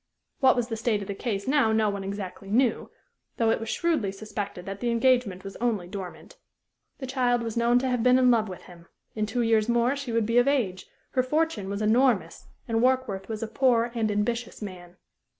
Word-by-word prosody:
What 265 Hz, -1 st, +5 dB
was 245 Hz, -1 st, -1 dB
the 225 Hz, -, -2 dB
state 220 Hz, -2 st, 0 dB
of -, -, -10 dB
the 200 Hz, -, -3 dB
case 200 Hz, -1 st, -3 dB
now 270 Hz, -5 st, +3 dB
no 220 Hz, -1 st, +2 dB
one 200 Hz, -1 st, -5 dB
exactly 195 Hz, 0 st, -6 dB
knew; 235 Hz, +2 st, +1 dB, 0.5 s
though 225 Hz, -1 st, +3 dB
it -, -, +1 dB
was 225 Hz, 0 st, -5 dB
shrewdly 305 Hz, -, 0 dB
suspected 200 Hz, -2 st, -6 dB
that 195 Hz, 0 st, -6 dB
the 240 Hz, -, -1 dB
engagement 235 Hz, -5 st, +2 dB
was 195 Hz, 0 st, -8 dB
only 220 Hz, -7 st, -1 dB
dormant. 190 Hz, -1 st, -9 dB, 0.6 s
The 265 Hz, -, -6 dB
child 250 Hz, -2 st, +1 dB
was 225 Hz, -2 st, -4 dB
known 235 Hz, +1 st, +3 dB
to 260 Hz, +1 st, 0 dB
have 250 Hz, -2 st, 0 dB
been 250 Hz, +2 st, +5 dB
in 250 Hz, -1 st, +5 dB
love 220 Hz, -3 st, +2 dB
with 185 Hz, -, -9 dB
him; 170 Hz, -1 st, -15 dB, 0.3 s
in 215 Hz, -1 st, -2 dB
two 240 Hz, +3 st, -1 dB
years 225 Hz, -1 st, +2 dB
more 240 Hz, +3 st, +2 dB
she 275 Hz, -4 st, -5 dB
would 230 Hz, -1 st, +1 dB
be 230 Hz, +2 st, +3 dB
of 245 Hz, -, +2 dB
age; 215 Hz, -10 st, 0 dB, 0.2 s
her 255 Hz, -, +2 dB
fortune 255 Hz, -6 st, -1 dB
was 200 Hz, +2 st, -3 dB
enormous, 220 Hz, -6 st, +2 dB, 0.2 s
and 225 Hz, -1 st, 0 dB
Warkworth 250 Hz, -7 st, 0 dB
was 220 Hz, 0 st, -4 dB
a -, -, -3 dB
poor 240 Hz, 0 st, +2 dB
and 225 Hz, -2 st, 0 dB
ambitious 225 Hz, +3 st, -2 dB
man. 180 Hz, -3 st, -9 dB
225 Hz, 215 wpm, -26 LUFS, 200-245 Hz, 0.6 s, What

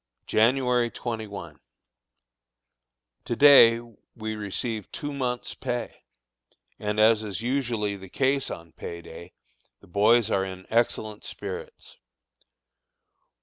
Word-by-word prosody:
January 125 Hz, +1 st, +2 dB
21. 105 Hz, -, -6 dB, 1.7 s
To 120 Hz, -, -2 dB
day 115 Hz, -3 st, +8 dB, 0.4 s
we 110 Hz, -1 st, -4 dB
received 105 Hz, +1 st, -4 dB
two 145 Hz, 0 st, -5 dB
months' 125 Hz, -3 st, -3 dB
pay, 125 Hz, -2 st, -5 dB, 0.7 s
and, 105 Hz, 0 st, -2 dB
as 110 Hz, 0 st, +5 dB
is 105 Hz, 0 st, -5 dB
usually 120 Hz, -5 st, -1 dB
the 95 Hz, -1 st, -11 dB
case 135 Hz, +3 st, +1 dB
on 85 Hz, -1 st, -8 dB
pay 85 Hz, +1 st, -8 dB
day, 85 Hz, +2 st, -11 dB, 0.5 s
the -, -, -19 dB
boys 110 Hz, +4 st, +3 dB
are 95 Hz, -, +2 dB
in 95 Hz, -1 st, -7 dB
excellent 110 Hz, -2 st, 0 dB
spirits. 475 Hz, +1 st, -8 dB
110 Hz, 105 wpm, -26 LUFS, 100-125 Hz, 1.7 s, day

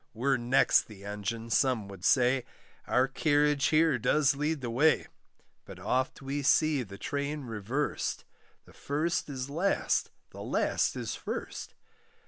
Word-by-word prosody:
We're 135 Hz, +4 st, +1 dB
next 120 Hz, +2 st, +3 dB
the 100 Hz, -2 st, -12 dB
engine, 105 Hz, +3 st, -4 dB
some 125 Hz, -3 st, +2 dB
would 100 Hz, -2 st, -11 dB
say, 125 Hz, +3 st, +3 dB, 0.4 s
Our 130 Hz, +1 st, +3 dB
carriage 145 Hz, 0 st, +2 dB
here 155 Hz, -4 st, +3 dB
does 145 Hz, +4 st, +3 dB
lead 150 Hz, +1 st, -1 dB
the 120 Hz, -2 st, -3 dB
way; 150 Hz, +7 st, +3 dB, 0.6 s
But -, -, -11 dB
oft 130 Hz, +1 st, -1 dB
we 140 Hz, +2 st, -2 dB
see 150 Hz, +1 st, +3 dB
the 100 Hz, -4 st, -8 dB
train 145 Hz, +5 st, -3 dB
reversed 115 Hz, +5 st, -3 dB, 0.4 s
The -, -, -18 dB
first 155 Hz, +3 st, -2 dB
is 130 Hz, -2 st, -4 dB
last, 170 Hz, +8 st, 0 dB, 0.2 s
the -, -, -10 dB
last -, -, 0 dB
is -, -, -4 dB
first. -, -, -6 dB
135 Hz, 140 wpm, -29 LUFS, 115-150 Hz, 0.6 s, next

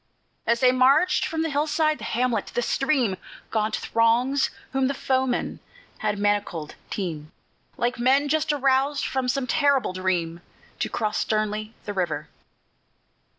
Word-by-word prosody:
As 235 Hz, 0 st, +2 dB
they 250 Hz, -1 st, +6 dB
march, 265 Hz, +8 st, +4 dB
from 320 Hz, 0 st, -1 dB
the 325 Hz, -, -1 dB
hillside, 305 Hz, +1 st, +1 dB
the -, -, -9 dB
hamlet, 245 Hz, 0 st, 0 dB
the 240 Hz, -, +1 dB
stream, 260 Hz, -8 st, +1 dB, 0.3 s
Gaunt 215 Hz, 0 st, 0 dB
throngs 240 Hz, +4 st, +2 dB, 0.2 s
whom 270 Hz, -1 st, +1 dB
the 275 Hz, -, -1 dB
foemen 260 Hz, -1 st, -1 dB, 0.4 s
had 210 Hz, -1 st, -1 dB
manacled, 205 Hz, -6 st, -1 dB, 0.2 s
teem, 160 Hz, -6 st, -4 dB, 0.5 s
Like 240 Hz, +1 st, -1 dB
men 270 Hz, +4 st, +3 dB
just 310 Hz, +1 st, +1 dB
aroused 275 Hz, 0 st, +1 dB
from 265 Hz, -1 st, -1 dB
some 255 Hz, +1 st, 0 dB
terrible 280 Hz, -5 st, +2 dB
dream, 175 Hz, -3 st, -1 dB, 0.4 s
To -, -, -1 dB
cross 215 Hz, -2 st, -1 dB
sternly 215 Hz, 0 st, -1 dB
the 205 Hz, -, -4 dB
river. 185 Hz, -3 st, -2 dB
250 Hz, 140 wpm, -25 LUFS, 210-275 Hz, 0.5 s, they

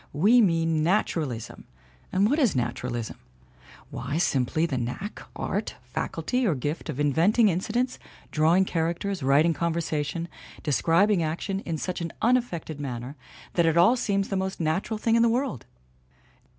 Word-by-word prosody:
We 210 Hz, +12 st, +5 dB
mean 165 Hz, -5 st, +2 dB
nat 190 Hz, +7 st, +3 dB
uralism. 130 Hz, -9 st, -5 dB, 0.5 s
And 195 Hz, +2 st, +3 dB
what 290 Hz, +7 st, +1 dB
is 250 Hz, -, +3 dB
naturalism? 120 Hz, -1 st, -3 dB, 0.7 s
Why, 150 Hz, -, -3 dB
simply 155 Hz, -1 st, +1 dB
the 135 Hz, -6 st, -2 dB
knack, 125 Hz, -, -5 dB
art, -, -, -3 dB
faculty 255 Hz, +1 st, -2 dB
or 170 Hz, -, +2 dB
gift 145 Hz, +6 st, -4 dB
of 145 Hz, -2 st, -4 dB
inventing 170 Hz, -, +3 dB
incidents, 220 Hz, +8 st, -1 dB, 0.3 s
drawing 165 Hz, +5 st, +3 dB
characters, 170 Hz, +3 st, -2 dB
writing 145 Hz, +5 st, +4 dB
conversation, 165 Hz, 0 st, -2 dB, 0.4 s
describing 170 Hz, -, +3 dB
action 170 Hz, +5 st, -2 dB
in 165 Hz, -2 st, -1 dB
such 180 Hz, +2 st, -4 dB
an 165 Hz, -1 st, -3 dB
unaffected 225 Hz, -, 0 dB
manner 130 Hz, -1 st, -5 dB, 0.4 s
that 170 Hz, -2 st, +3 dB
it 165 Hz, +1 st, +2 dB
all 185 Hz, +9 st, +6 dB
seems 200 Hz, -5 st, 0 dB
the 195 Hz, -, -1 dB
most 190 Hz, 0 st, -4 dB
natural 170 Hz, +7 st, -1 dB
thing 225 Hz, +1 st, +1 dB
in 230 Hz, -, +4 dB
the 235 Hz, -, +4 dB
world! 245 Hz, -, -2 dB
170 Hz, 150 wpm, -26 LUFS, 150-200 Hz, 0.7 s, all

